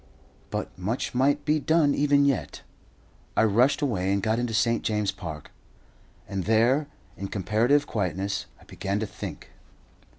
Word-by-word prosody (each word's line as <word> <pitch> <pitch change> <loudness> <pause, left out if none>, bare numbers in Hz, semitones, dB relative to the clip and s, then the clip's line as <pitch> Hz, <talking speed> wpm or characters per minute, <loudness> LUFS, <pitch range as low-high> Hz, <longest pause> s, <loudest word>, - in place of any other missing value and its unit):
But - - -4
much 110 +7 -2
might 140 +3 +2
be 155 +1 +2
done 155 -1 +3
even 145 -1 +3
yet. 140 -2 -1 0.7
I - - +5
rushed 125 +8 +3
away, 95 -8 0
and 100 - +2
got 110 +2 +1
into 120 -1 -1
St. 115 +1 +2
James's 105 -2 0
Park, 85 -6 -8 0.8
and 95 -2 -3
there, 120 +7 +3 0.3
in 100 - -4
comparative 115 +9 +2
quietness, 100 - -2
I - - -19
began 100 +1 -3
to - - 0
think. - - -8
115 Hz, 145 wpm, -26 LUFS, 100-140 Hz, 0.8 s, I